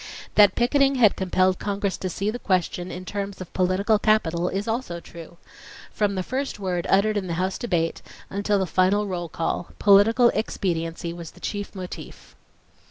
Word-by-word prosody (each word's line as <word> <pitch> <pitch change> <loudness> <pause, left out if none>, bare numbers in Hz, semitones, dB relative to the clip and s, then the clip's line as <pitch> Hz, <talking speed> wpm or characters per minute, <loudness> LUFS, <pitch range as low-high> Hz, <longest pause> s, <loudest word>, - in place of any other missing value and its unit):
That 205 -3 +6
picketing 275 +3 +3
had 230 -6 +5
compelled 185 0 +1
Congress 200 -1 -2
to 185 - -3
see 200 +4 -2
the 245 - -6
question 180 -2 -1
in 185 +1 -7
terms 200 0 -4
of 185 - -9
political 190 +4 +2
capital 180 -5 +2
is 200 +3 -3
also 225 -7 -2
true. 170 0 -12 0.5
From 205 -2 0
the 185 - -1
first 265 +7 -3
word 180 -3 -2
uttered 210 +2 +3
in 190 -2 -2
the 170 - -2
House 185 +2 -2
debate, 170 -8 -1 0.3
until 205 +1 0
the 190 - +1
final 185 +4 +2
roll 175 -4 -4
call, 165 +2 -3
political 220 +4 +5
expediency 170 -5 -2
was 170 -2 -8
the - - -18
chief 205 0 -5
motif. 185 -2 -9
195 Hz, 170 wpm, -24 LUFS, 180-210 Hz, 0.5 s, That